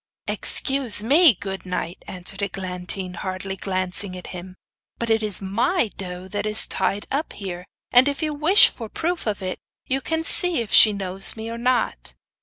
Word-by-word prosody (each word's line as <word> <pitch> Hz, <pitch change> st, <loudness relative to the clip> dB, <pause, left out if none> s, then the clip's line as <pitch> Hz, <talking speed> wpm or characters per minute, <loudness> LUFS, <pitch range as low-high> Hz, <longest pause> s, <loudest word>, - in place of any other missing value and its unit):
'Excuse 265 Hz, -6 st, +2 dB
me, 285 Hz, -, +6 dB
good 195 Hz, 0 st, -6 dB
knight' 180 Hz, -1 st, -4 dB
answered 185 Hz, +2 st, -3 dB
Eglantine, 185 Hz, -1 st, -4 dB
hardly 185 Hz, +1 st, -5 dB
glancing 185 Hz, 0 st, -3 dB
at 180 Hz, -, -9 dB
him, 180 Hz, +1 st, -8 dB, 0.4 s
'but 235 Hz, -1 st, -2 dB
it 225 Hz, 0 st, +3 dB
is 210 Hz, -2 st, -4 dB
MY 230 Hz, -, +1 dB
doe 180 Hz, -1 st, -7 dB
that 205 Hz, +2 st, -3 dB
is 215 Hz, 0 st, +2 dB
tied 205 Hz, +1 st, -1 dB
up 290 Hz, +4 st, -2 dB
here! 180 Hz, -3 st, -6 dB, 0.3 s
And 250 Hz, +2 st, +6 dB
if 285 Hz, +3 st, -2 dB
you 305 Hz, -1 st, -1 dB
wish 320 Hz, +9 st, +6 dB
for 230 Hz, -, -8 dB
a -, -, -22 dB
proof 335 Hz, 0 st, -3 dB
of 205 Hz, -2 st, -2 dB
it, 185 Hz, 0 st, -4 dB, 0.3 s
you 270 Hz, +1 st, -1 dB
can 320 Hz, +3 st, -1 dB
see 360 Hz, -2 st, +2 dB
if 230 Hz, -4 st, -4 dB
she 215 Hz, -, +9 dB
knows 195 Hz, -1 st, -1 dB
me 225 Hz, +1 st, -6 dB
or 230 Hz, -, -5 dB
not. 250 Hz, +1 st, -1 dB
205 Hz, 185 wpm, -23 LUFS, 185-255 Hz, 0.4 s, she